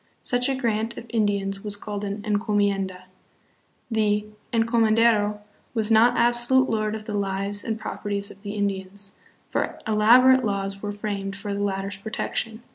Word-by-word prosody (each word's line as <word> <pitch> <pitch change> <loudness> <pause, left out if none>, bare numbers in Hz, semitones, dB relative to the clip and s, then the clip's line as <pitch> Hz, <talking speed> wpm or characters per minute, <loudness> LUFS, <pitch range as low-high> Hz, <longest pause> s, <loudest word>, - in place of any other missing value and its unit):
Such 245 +1 +2
a 270 - +1
grant 225 -3 -1
of - - -7
Indians 200 -3 0
was 205 -1 -2
called 205 -1 -5
an 205 +1 -4
"encomienda." 205 -3 0 0.9
The 210 -1 +1 0.3
"encomen 225 -1 +3
dero" 210 -2 +3 0.3
was 220 -1 +1
not 235 +2 +5
absolute 240 +2 +3
lord 215 -1 0
of 215 -1 -7
the 215 - -5
lives 200 0 -2
and 225 -1 -3
properties 205 -2 -4
of 195 - -16
the 205 -1 -5
Indians, 200 -1 -2 0.4
for - - -1
elaborate 245 +4 +6
laws 195 -2 -2
were 205 - -3
framed 200 -1 -4
for 205 0 -4
the 200 - -2
latter's 195 0 -2
protection. 220 +2 -3
210 Hz, 155 wpm, -25 LUFS, 200-225 Hz, 0.9 s, elaborate